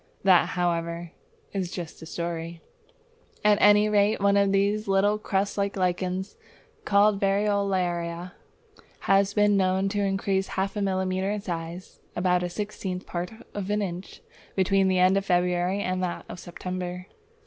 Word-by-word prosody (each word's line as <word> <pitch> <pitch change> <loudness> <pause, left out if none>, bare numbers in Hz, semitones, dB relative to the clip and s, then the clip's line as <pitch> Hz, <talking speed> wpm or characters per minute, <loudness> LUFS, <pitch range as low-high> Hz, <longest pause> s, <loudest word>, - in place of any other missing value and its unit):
That, 185 -2 +5
however, 170 -1 -1 0.4
is 190 -3 -2
just 175 -3 -7
a 160 - -9
story! 170 0 -4 0.9
At 210 -1 +5
any 205 +1 +6
rate, 210 0 +2
one 200 0 +3
of 200 -1 +3
these 205 +2 +1
little 200 +2 +2
crust 200 0 -1
lichens 185 -1 -1 0.5
called 200 0 +4
Variolaria 190 -4 0 0.7
has 195 +1 +2
been 205 -1 +4
known 190 0 +2
to 205 0 -1
increase 195 -1 0
half 195 +2 -1
a 205 - -2
millimetre 190 0 0
in 210 0 -2
size 170 -1 -6 0.2
(about 180 0 +2
a 180 - -2
sixtieth 190 -1 -5
part 175 0 -4 0.2
of 200 -1 -4
an 210 0 +1
inch) 180 0 -6 0.3
between 195 0 +3
the 185 -1 +2
end 185 +2 +4
of 195 - -1
February 180 +1 +1
and 185 -1 -1
that 180 -1 -3
of - - -8
September. 180 +1 -5
190 Hz, 150 wpm, -26 LUFS, 180-200 Hz, 0.9 s, any